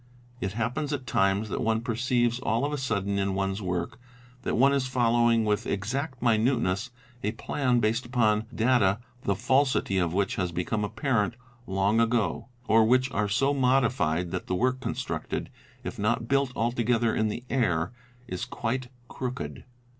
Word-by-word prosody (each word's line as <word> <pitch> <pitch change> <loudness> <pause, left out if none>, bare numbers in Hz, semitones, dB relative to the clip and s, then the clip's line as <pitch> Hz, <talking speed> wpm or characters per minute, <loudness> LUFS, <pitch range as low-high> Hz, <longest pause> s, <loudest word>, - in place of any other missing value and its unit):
It 95 -3 -3
happens 125 +7 -2
at 135 -3 -3
times 95 -1 +1
that - - -2
one 110 0 +1
perceives 120 0 +1
all 115 +2 0
of 150 - -2
a - - -1
sudden 100 -5 -1
in 100 -1 0
one's 95 +1 -1
work 90 +1 -3 0.4
that - - -1
one 135 +3 +5
is 135 -2 +1
following 120 -2 +3
with 105 -1 0
exact 125 +6 -3
minuteness 115 -4 +2 0.3
a 105 +2 0
plan 125 +1 0
based 115 +2 0
upon 110 -3 +2
data 115 -4 +3 0.3
the 100 - +2
falsity 130 -3 +2
of 85 -2 +1
which 100 +2 0
has 90 -2 -1
become 90 +5 -1
apparent 110 +1 0 0.3
long 95 +3 +2
ago, 115 0 +1 0.2
or 110 0 +5
which 130 +3 +3
are 105 -1 0
so 135 +8 +2
modified 120 - +2
that 95 -2 -4
the 90 - 0
work 130 +5 +1
constructed, 120 -9 -4 0.3
if 120 - -6
not 115 +2 0
built 140 0 +2
altogether 120 0 +1
in 110 - +1
the 115 +3 -4
air, 95 -8 +1 0.4
is 90 -5 -4
quite 125 +2 -3 0.2
crooked. 130 0 -5
115 Hz, 160 wpm, -27 LUFS, 100-125 Hz, 0.4 s, one